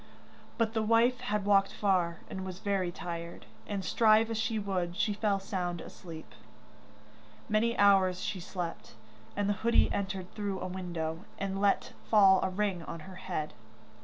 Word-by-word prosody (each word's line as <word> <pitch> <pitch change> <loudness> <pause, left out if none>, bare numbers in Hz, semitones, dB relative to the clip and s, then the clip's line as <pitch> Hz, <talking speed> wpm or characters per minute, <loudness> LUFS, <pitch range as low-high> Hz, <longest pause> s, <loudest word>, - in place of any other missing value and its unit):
But 225 -2 +1
the 220 - +1
wife 230 +3 +3
had 210 -5 -1
walked 195 -1 +4
far, 180 -5 +1
and 190 - -5
was 185 -1 -6
very 195 -3 -1
tired, 170 -1 -6 0.2
and 200 -2 -3
strive 220 0 +4
as 225 - -2
she 220 0 0
would, 185 -4 -2
she 215 -1 +1
fell 205 -1 +1
sound 180 -3 -3
asleep. 165 -2 -10 1.1
Many 230 +1 +1
hours 190 -3 +5
she 200 - -3
slept, 175 -1 -6 0.4
and 205 -1 0
the 205 - +2
hoodie 235 +1 +3
entered 190 -2 -3
through 200 -3 -3
a - - -4
window, 175 -2 -4
and 195 0 -3
let 200 -1 +2 0.2
fall 195 -3 +7
a - - 0
ring 190 -2 -1
on 165 0 -7
her 185 +2 -10
hand. 175 -5 -4
195 Hz, 165 wpm, -31 LUFS, 180-210 Hz, 1.1 s, fall